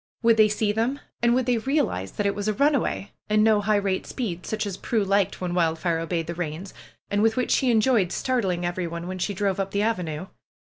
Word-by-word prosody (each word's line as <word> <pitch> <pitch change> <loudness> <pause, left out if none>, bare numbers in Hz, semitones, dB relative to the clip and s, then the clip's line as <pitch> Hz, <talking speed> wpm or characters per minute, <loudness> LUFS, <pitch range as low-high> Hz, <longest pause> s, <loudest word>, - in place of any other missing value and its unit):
Would 230 -1 +5
they 215 -1 +6
see 210 0 0
them? 235 +6 -1 0.2
And 240 0 +4
would 255 -1 +1
they 245 -2 +2
realize 265 - -1
that 205 - -2
it 200 - +2
was 205 0 -4
a 215 - +1
run 290 +6 +3
away, 225 -6 -1 0.2
and 215 0 +4
no 215 -1 +4
high 210 +1 +2
rate 195 -2 -1
speed, 180 - -4
such 220 - -2
as 200 -3 -4
Prue 220 +2 -1
liked 195 -1 +1
when 180 -1 -3
Wildfire 165 -1 +1
obeyed 165 0 -2
the 170 - -4
reins, 170 +2 -5 0.4
and 205 0 +2
with 225 +1 +2
which 250 - 0
she 260 - +3
enjoyed 220 -4 +3
startling 190 -9 -1
everyone 175 -1 -3
when 185 +1 -5
she 200 +2 -2
drove 195 0 0
up 195 0 -1
the 200 +1 0
avenue? 180 -7 -2
200 Hz, 230 wpm, -25 LUFS, 180-225 Hz, 0.4 s, they